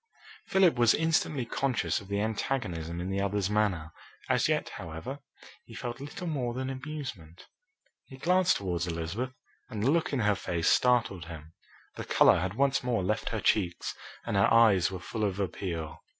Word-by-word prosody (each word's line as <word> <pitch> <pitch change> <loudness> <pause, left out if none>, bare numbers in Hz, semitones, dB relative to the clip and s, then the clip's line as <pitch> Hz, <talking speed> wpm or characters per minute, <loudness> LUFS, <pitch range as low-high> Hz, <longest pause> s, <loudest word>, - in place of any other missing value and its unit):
Philip 185 -8 +4
was 120 -1 +6
instantly 155 -4 +1
conscious 130 -1 0
of 100 - -13
the 100 +1 -1
antagonism 95 -7 -2
in 90 +2 -3
the 100 0 0
other's 100 0 0
manner. 95 -7 0 0.4
As - - +3
yet, - - 0
however, 85 - -7 0.4
he 115 - -13
felt 120 0 -5
little 145 +7 -7
more 130 -7 -2
than 130 +1 -3
amusement. 130 - -7 0.6
He 130 - -11
glanced 180 +5 +3
towards 90 -3 -2
Elizabeth, 90 +10 -3 0.3
and 105 -4 -4
the 135 - +4
look 165 0 +1
in 135 -4 0
her 105 -1 +3
face 85 -3 -1
startled 120 -9 +2
him. 80 -1 -10 0.4
The - - -4
colour - - +5
had 95 +3 -2
once 135 +1 +2
more 120 -6 0
left 105 +4 -1
her 110 - -2
cheeks 90 -5 +1 0.3
and - - -2
her 100 - +4
eyes 110 -6 +5
were 95 - -5
full 110 +5 -4
of 100 -2 -1
appeal. 85 -5 -4
110 Hz, 175 wpm, -29 LUFS, 90-130 Hz, 0.6 s, was